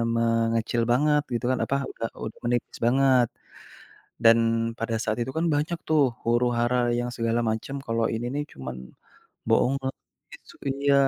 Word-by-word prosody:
mengecil 115 0 +1
banget 150 +4 +3
gitu 120 +1 -2
kan, 130 - 0
apa 140 - -1 0.2
udah 115 - -4 0.2
u - - -2 0.2
menipis 120 0 -1
banget. 130 -1 +4 1.0
Dan 115 0 +8 0.4
pada 115 0 -1
saat 110 +1 -1
itu 130 +2 -4
kan 165 +1 +1
banyak 150 +4 0
tuh 155 -2 +4 0.2
huru-hara 120 +1 +2 0.2
yang 120 0 -2
segala 115 0 0
macam 110 +5 -4
kalo 115 0 0
ini 115 +2 -3
nih 145 0 -1
cuman 65 -1 -6 0.7
bohongan 135 +1 +2 0.4
isu - - -17
iya, 140 +1 +1
120 Hz, 145 wpm, -26 LUFS, 115-135 Hz, 1.0 s, Dan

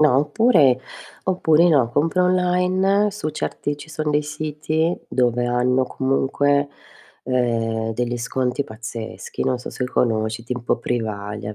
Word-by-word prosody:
No 150 -4 +5
oppure 150 - +4 0.5
oppure 175 -2 +3
no, 135 -8 +3
compra 165 +7 +1
online 185 +3 +2
su 200 -6 -4
certi 145 -1 -3
ci 145 +1 -12
son 155 -1 -2
dei 150 0 +2
siti 155 +2 -2
dove 120 -1 +1
hanno 125 +2 +2
comunque, 140 +2 +1 0.6
ehm, 115 -3 0
degli 120 +1 -1
sconti 125 +2 -1
pazzeschi, 115 -1 -6
non 130 -1 0
so 125 - -7
se 125 - -3
conosci, 110 -2 0
tipo 120 0 -1
Privalia, 105 -3 -3
130 Hz, 130 wpm, -21 LUFS, 120-155 Hz, 0.6 s, No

